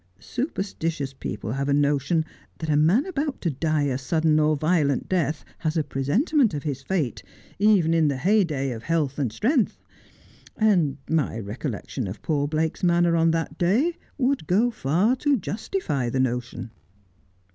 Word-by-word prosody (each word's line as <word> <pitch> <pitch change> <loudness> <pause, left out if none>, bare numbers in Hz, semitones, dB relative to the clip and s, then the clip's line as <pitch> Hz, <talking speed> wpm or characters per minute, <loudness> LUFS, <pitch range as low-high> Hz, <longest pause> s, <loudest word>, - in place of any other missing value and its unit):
Superstitious 165 - -3
people 105 -4 -5
have 140 +3 -2
a 140 - +3
notion 145 +3 +1 0.3
that 160 -2 -3
a - - +3
man 170 - +4
about 300 -6 -3
to 170 - 0
die 155 +2 0
a 135 -2 -1
sudden 155 +3 +2
or 155 0 +3
violent 155 -3 +1
death 160 -5 -1
has 160 0 -1
a 155 - +2
presentiment 190 - +1
of 145 - -4
his 140 -3 -3
fate, 150 -4 -2 0.4
even 200 -6 +4
in 165 -2 +3
the 140 -2 0
heyday 155 -5 +1
of 115 -2 -6
health 150 -2 -1
and 130 -6 0
strength. 240 - +1 0.8
And 175 -11 +2
my 150 -8 0
re 105 -1 -5
collection 130 -3 -4
of 95 - -8
poor 145 -3 0
Blake's 155 +1 -1
manner 175 -1 +3
on 165 0 +3
that 165 0 -2
day 240 - +2 0.2
would 265 - 0
go 220 +7 +3
far 190 - +1
to 285 +1 +2
justify 200 - -2
the 130 - -1
notion.' 125 -2 -2
155 Hz, 165 wpm, -24 LUFS, 140-190 Hz, 0.8 s, man